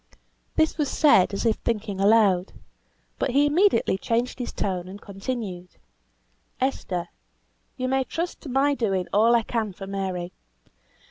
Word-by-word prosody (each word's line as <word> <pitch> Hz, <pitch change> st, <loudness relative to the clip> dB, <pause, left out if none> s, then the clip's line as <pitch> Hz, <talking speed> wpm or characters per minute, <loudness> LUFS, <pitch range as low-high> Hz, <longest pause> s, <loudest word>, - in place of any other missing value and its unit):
This 315 Hz, 0 st, +1 dB
was 290 Hz, -3 st, +1 dB
said 240 Hz, -, +4 dB
as 200 Hz, +3 st, -3 dB
if 225 Hz, -2 st, +2 dB
thinking 210 Hz, -4 st, -3 dB
aloud; 200 Hz, -3 st, +4 dB, 0.7 s
but -, -, 0 dB
he 280 Hz, +3 st, +3 dB
immediately 320 Hz, -, +3 dB
changed 240 Hz, +4 st, -1 dB
his 245 Hz, -, -4 dB
tone, 185 Hz, -3 st, -3 dB
and 195 Hz, +2 st, -9 dB
continued, 195 Hz, -3 st, -6 dB, 0.8 s
"Esther, 185 Hz, -9 st, -2 dB, 0.7 s
you 255 Hz, -, -2 dB
may 265 Hz, +1 st, +1 dB
trust 335 Hz, +6 st, -4 dB
to 295 Hz, -, -8 dB
my 275 Hz, +3 st, +2 dB
doing 195 Hz, -8 st, 0 dB
all 225 Hz, +4 st, +5 dB
I 230 Hz, -, +3 dB
can 220 Hz, -3 st, -2 dB
for 195 Hz, -, -8 dB
Mary. 190 Hz, -2 st, -4 dB
220 Hz, 145 wpm, -25 LUFS, 195-260 Hz, 0.8 s, all